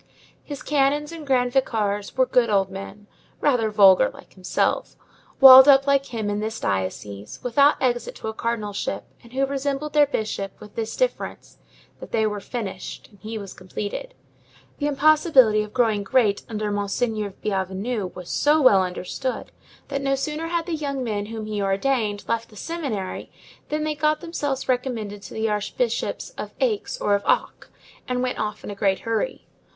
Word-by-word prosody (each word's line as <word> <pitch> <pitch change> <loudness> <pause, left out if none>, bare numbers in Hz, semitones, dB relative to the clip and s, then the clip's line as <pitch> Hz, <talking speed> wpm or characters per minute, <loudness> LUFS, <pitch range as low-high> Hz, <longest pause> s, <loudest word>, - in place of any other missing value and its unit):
His 285 -2 -8
canons 295 +1 +1
and 320 -3 -9
grand 250 -2 +2
vicars 210 -6 0
were 260 - +5
good 250 -2 +2
old 195 -2 +2
men, 195 +2 -8 0.3
rather 245 -6 +2
vulgar 195 -3 +6
like - - -15
himself, 185 -1 -1 0.4
walled 265 0 +11
up 275 -1 +7
like 275 -1 +2
him 220 -3 -4
in 205 0 -1
this 220 +1 -3
diocese, 100 +2 -3
without 280 +4 +4
exit 240 -2 -1
to - - -7
a 220 - -3
cardinalship, 215 -3 -3 0.2
and 235 - -17
who 270 +1 +2
resembled 280 +2 -3
their 295 -1 +5
bishop, 215 -6 -3
with 210 -1 -13
this 225 -1 -4
difference, - - -3 0.4
that - - -10
they 220 -1 +2
were 210 -1 -2
finished 195 -4 -6
and 205 - -21
he 220 +2 -6
was 200 -2 -8
completed. 205 - -6 0.6
The 290 - 0
impossibility 285 -6 +4
of 210 0 -6
growing 225 -4 +2
great 205 -1 +2
under 215 -2 -2
Monseigneur 205 0 -2
Bienvenu 195 +2 -2
was 180 -1 -8
so 300 +2 +3
well 230 -9 +6
understood, 185 +8 -4 0.4
that 275 -1 -2
no 275 0 +1
sooner 300 +4 -3
had 335 -1 -1
the 345 - -4
young 280 -4 -2
men 205 -3 -2
whom 220 -1 -6
he 210 -1 -3
ordained 205 +1 0
left 230 0 -1
the 215 - -17
seminary 245 - -4 0.4
than 305 +1 -1
they 310 0 -1
got 305 +1 +1
themselves 290 -6 -3
recommended 235 -5 -2
to - - -10
the 220 0 0
archbishops 220 - -2
of - - -6
Aix 450 -5 -1
or 205 - +1
of 200 - +2
Auch, - - 0 0.4
and 250 -1 -1
went 255 - -2
off 210 0 -3
in - - -6
a - - -4
great 195 -1 +1
hurry. 230 - -2
230 Hz, 175 wpm, -23 LUFS, 205-275 Hz, 0.6 s, walled